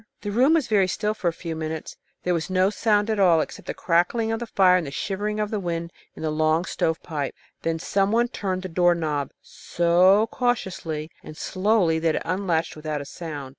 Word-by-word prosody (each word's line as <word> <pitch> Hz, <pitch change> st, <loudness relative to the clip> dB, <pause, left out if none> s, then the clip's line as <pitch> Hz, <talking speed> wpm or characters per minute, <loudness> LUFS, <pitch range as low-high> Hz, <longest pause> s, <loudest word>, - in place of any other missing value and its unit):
The 205 Hz, -, -4 dB
room 260 Hz, +9 st, +4 dB
was 315 Hz, -5 st, +2 dB
very 200 Hz, -4 st, +3 dB
still 210 Hz, +3 st, -1 dB
for 210 Hz, -4 st, -3 dB
a -, -, +3 dB
few 165 Hz, 0 st, -6 dB
minutes. 160 Hz, 0 st, -5 dB, 0.3 s
There 180 Hz, -, +1 dB
was 165 Hz, +1 st, -2 dB
no 185 Hz, +1 st, +2 dB
sound 210 Hz, 0 st, +1 dB
at 215 Hz, -, -1 dB
all 175 Hz, -4 st, +5 dB
except -, -, -5 dB
the -, -, -4 dB
crackling 180 Hz, +7 st, +1 dB
of 225 Hz, -, -1 dB
the 235 Hz, -, -5 dB
fire 190 Hz, -4 st, +4 dB
and 170 Hz, -5 st, -3 dB
the -, -, -4 dB
shivering 205 Hz, +8 st, -3 dB
of 210 Hz, -1 st, -1 dB
the 215 Hz, -, -1 dB
wind 170 Hz, -2 st, -4 dB, 0.2 s
in -, -, -8 dB
the 155 Hz, -, 0 dB
long 155 Hz, +2 st, +1 dB
stovepipe. 160 Hz, -5 st, -2 dB, 0.3 s
Then 165 Hz, 0 st, -1 dB
some 195 Hz, +4 st, 0 dB
one 235 Hz, +2 st, +3 dB
turned 190 Hz, -5 st, -3 dB
the -, -, -3 dB
door 175 Hz, 0 st, +3 dB
knob 150 Hz, -4 st, -2 dB
so 180 Hz, +5 st, +3 dB
cautiously 180 Hz, -, -2 dB
and 155 Hz, -, -11 dB
slowly 185 Hz, -4 st, +1 dB
that 160 Hz, -1 st, +1 dB
it -, -, -2 dB
unlatched 175 Hz, -2 st, -1 dB
without 155 Hz, -1 st, -4 dB
a -, -, -7 dB
sound. 145 Hz, -3 st, -7 dB
180 Hz, 210 wpm, -24 LUFS, 160-205 Hz, 0.3 s, all